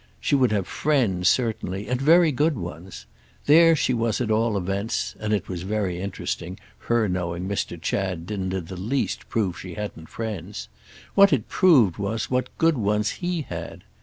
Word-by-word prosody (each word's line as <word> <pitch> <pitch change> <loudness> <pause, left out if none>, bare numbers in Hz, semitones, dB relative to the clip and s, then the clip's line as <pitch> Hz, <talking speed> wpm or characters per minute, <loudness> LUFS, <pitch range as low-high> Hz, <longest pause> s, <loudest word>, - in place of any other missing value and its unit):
She - - -1
would 130 -4 +4
have 100 -3 0
friends, 115 - +1
certainly—and 115 0 -1
very 165 +3 +5
good 150 +2 +1
ones. 85 +1 -8 0.4
There 165 +2 +7
she 130 - +1
was 115 -2 0
at 120 -3 -1
all 110 -1 +2
events—and 100 +3 -2
it 100 -3 0
was 90 -2 -5
very 95 -2 -2
interesting. 95 -1 -4 0.2
Her 120 -2 +1
knowing 90 -1 -3
Mr. 95 -3 -3
Chad 90 -1 -2
didn't 95 -1 -3
in 95 -3 -3
the 95 +2 -8
least 115 +9 -2
prove 100 -6 -1
she 90 -2 -8
hadn't 100 -6 -6
friends; 105 -4 -6 0.4
what 200 0 +6
it 125 -7 +1
proved 130 - +4
was 105 +4 -3
what 130 0 0
good 165 -5 +3
ones 105 0 +1
he 175 -3 -1
had. - - -7
105 Hz, 165 wpm, -24 LUFS, 95-125 Hz, 0.4 s, There